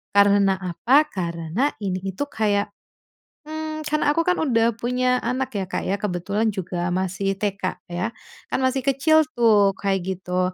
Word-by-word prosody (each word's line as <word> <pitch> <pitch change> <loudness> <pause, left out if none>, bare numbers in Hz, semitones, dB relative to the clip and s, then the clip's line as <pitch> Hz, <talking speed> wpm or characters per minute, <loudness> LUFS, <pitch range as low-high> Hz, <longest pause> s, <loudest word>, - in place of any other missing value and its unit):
Karena 200 -1 +5
apa? 235 - +3
Karena, 170 - -2
ini 185 -2 -1 0.2
itu 285 - -2
kayak, 205 -2 0 0.8
mmm, 310 0 -5
karena 300 -1 +2
aku 330 - +3
kan 360 0 +3
udah 235 -6 +2
punya 250 +1 +1
anak 255 +3 -1
ya, 190 - -2
Kak, - - -2
ya. 195 - +1
Kebetulan 200 +3 -1
juga 180 -2 -3
masih 190 +1 -1
TK 195 -3 -2
ya. 180 +6 -1 0.4
Kan - - 0
masih 260 +1 +1
kecil 315 +4 +4
tuh, 210 -4 +4
kayak 195 -2 0 0.2
gitu. 180 0 -1
205 Hz, 155 wpm, -23 LUFS, 185-260 Hz, 0.8 s, Karena